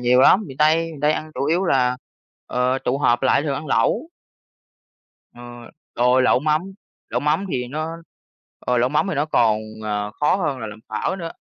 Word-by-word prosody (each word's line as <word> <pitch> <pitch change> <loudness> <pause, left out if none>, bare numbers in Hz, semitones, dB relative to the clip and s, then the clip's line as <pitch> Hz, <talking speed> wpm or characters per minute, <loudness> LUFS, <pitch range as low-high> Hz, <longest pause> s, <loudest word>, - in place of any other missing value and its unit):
nhiều 125 +1 +4
lắm. 190 +9 +6
Miền 135 -4 -10
Tây, 155 +2 +4 0.2
miền 150 - -11
Tây 150 +1 +3
ăn 155 0 -5
chủ 135 - -2
yếu 170 +6 +1
là, 125 -5 +2 0.5
ờ, 125 +1 0
tụ 135 +3 0
họp 120 -3 +2
lại 135 +2 +3
thường 145 -3 -1
ăn 150 +3 -5
lẩu. 215 - +1 1.2
Ờ, 120 - -13 0.5
rồi 125 +1 +3
lẩu 125 - +3
mắm 155 +1 +1 0.5
lẩu - - -1
mắm 150 +6 +1
thì 125 -1 -2
nó 155 +4 -4 0.6
ờ, 125 -1 0
lẩu 125 - +2
mắm 150 +7 +1
thì 190 - -1
nó 145 +1 +1
còn, 115 -8 +2 0.3
à, 105 -1 -2
khó 150 - +3
hơn 155 -8 -2
là 115 - -5
làm 105 0 -9
phở 190 - -2
nữa, 165 -3 -6
135 Hz, 200 wpm, -21 LUFS, 125-155 Hz, 1.2 s, lắm